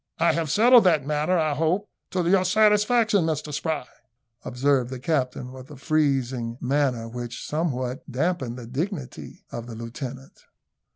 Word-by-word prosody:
I 170 - +3
have 165 -2 -1
settled 235 - +6
that 160 -6 +3
matter, 150 +5 +1
I 155 -2 +1
hope, 165 +7 0 0.2
to 180 -2 -1
your 185 +1 +4
satisfaction, 210 +1 +3
Mr 155 -2 -2
Spry," 155 -2 -2 0.6
observed 130 0 +1
the 130 - -5
captain, 125 -3 -2
with 130 +1 -11
a 150 - -10
freezing 130 -5 0
manner, 130 -3 0
which 120 +1 -6
somewhat 135 -3 -3
damped 165 +7 0
the 125 -2 -8
dignity 140 - -5
of 120 0 -6
the 115 - -8
lieutenant. 125 +3 -8
145 Hz, 150 wpm, -25 LUFS, 125-170 Hz, 0.6 s, settled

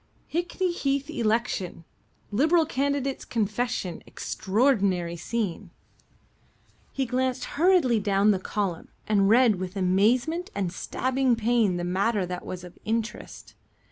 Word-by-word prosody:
"Hickney 350 +2 0
Heath 280 -2 -1
Election. 215 - -1 0.5
Liberal 315 +9 +3
Candidate's 280 -2 -1
Confession. 215 -4 -2
Extraordinary 195 -6 0
Scene." 200 +1 -3 1.2
He 270 - -1
glanced 255 +1 -1
hurriedly 320 - +3
down 200 +1 +3
the 195 - +1
column 190 -3 -3 0.2
and 200 -2 +3
read 230 -2 +5
with 185 +1 -5
amazement 230 - +2
and 190 -3 -2
stabbing 260 +3 0
pain 225 -4 +2
the 175 - -3
matter 195 +3 +1
that 180 0 -5
was 180 -1 -6
of 180 -1 -12
interest. 225 +1 -4
225 Hz, 115 wpm, -26 LUFS, 190-260 Hz, 1.2 s, read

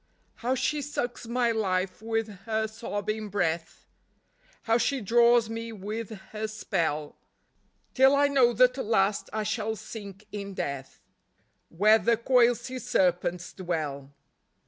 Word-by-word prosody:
How 250 +3 0
she 295 +3 0
sucks 245 -4 -4
my 240 0 +1
life 190 -3 -1
with 225 0 -1 0.2
her 220 0 0
sobbing 215 -1 -4
breath, 170 -4 -2 0.8
How 230 0 +2
she 275 +2 +1
draws 235 +1 +4
me 230 +1 -5
with 215 +2 -5 0.2
her 220 0 -3
spell, 165 -8 -2 0.8
Till 265 +1 +6
I 285 0 +4
know 265 -4 +4
that 255 +2 +3
at - - -1
last 205 -2 +1
I 215 0 -2
shall 215 +1 -2
sink 205 -1 -9
in 200 -2 -6
death 140 -5 -5 0.7
Where 215 +6 +5
the 235 0 +2
coiled 245 0 +4
sea 255 0 -6
serpents 180 -4 0
dwell. 155 -7 -4
220 Hz, 135 wpm, -28 LUFS, 195-235 Hz, 0.8 s, Till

